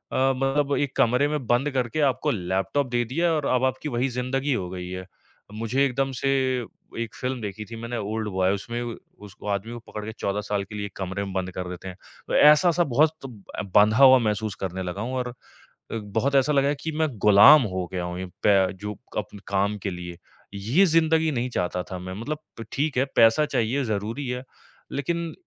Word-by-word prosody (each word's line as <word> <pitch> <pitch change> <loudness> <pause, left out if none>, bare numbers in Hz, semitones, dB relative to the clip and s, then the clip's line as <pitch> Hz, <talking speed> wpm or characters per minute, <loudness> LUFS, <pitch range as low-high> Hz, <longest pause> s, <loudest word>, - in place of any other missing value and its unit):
मतलब 135 +2 +1
एक 140 -2 -1
कमरे 125 +2 +3
में 150 -3 -3
बंद 125 +5 +2
करके 130 +2 -1
आपको - - -2
लैपटॉप 95 +8 -1
दे 120 0 +1
दिया 165 +8 0
और 150 -3 -1
अब 125 - +1
आपकी 130 +3 -2
वही 125 +1 0
ज़िंदगी 130 +3 -1
हो 90 -7 -2
गई 90 0 -6
है। 95 0 -6 0.5
मुझे 115 +5 0
एकदम 135 +1 0
से 135 - -1 0.7
एक 115 -1 -4
फ़िल्म 130 -1 -3
देखी 105 0 -5
थी 115 - -9
मैंने, 115 +1 -5
ओल्ड 110 0 -3
बॉय, 95 -1 +1
उसमें 115 +4 -4
व 120 -1 -5 0.3
उसको 100 +1 -11
आदमी 100 +3 -2
को 120 - -6
पकड़ 105 - -5
के 110 - -5
14 100 +1 -1
साल 105 -1 -2
के 100 +2 -10
लिए 105 -1 -3
1 100 - -10
कमरे 95 +1 -3
में 95 - -7
बंद 95 -1 -2
कर 90 0 -5
देते 90 +1 -8
हैं। 90 -1 -8 0.3
तो - - -1
ऐसा-सा 165 +4 +6
बहुत 145 +2 +3
सब 120 -7 -10
अ, - - -2
बँधा 105 +2 +6
हुआ 130 -1 +9
महसूस 110 -2 -1
करने 95 0 -3
लगा 90 +2 -4
हूँ 125 +3 -3
और 125 -1 -2
अ, - - -9 0.6
बहुत 110 +6 -1
ऐसा 135 +2 +3
लगा 140 -1 +3
है 145 - +1
कि 160 - -3
मैं 160 -1 +2
गुलाम 105 +9 +8
हो 90 -1 -2
गया 90 -1 -2
हूँ 90 +1 -5
इ - - -4 0.2
पै 95 -2 +4
जो 105 0 -4 0.2
कप 105 - -4
काम 100 +1 +1
के 100 - -3
लिए। 90 -1 -7 0.4
ये 115 - +3
ज़िंदगी 160 -1 +3
नहीं 125 -1 -2
चाहता 90 -4 -1
था 95 - -4
मैं, 95 +1 -7
मतलब 150 +6 -3 0.3
ठीक 145 0 -1
है, 130 - +4
पैसा 115 +6 +6
चाहिए, 130 +1 0
ज़रूरी 110 +5 -3
है, 125 0 -3 0.5
लेकिन 170 +4 -2
115 Hz, 210 wpm, -25 LUFS, 100-135 Hz, 0.7 s, हुआ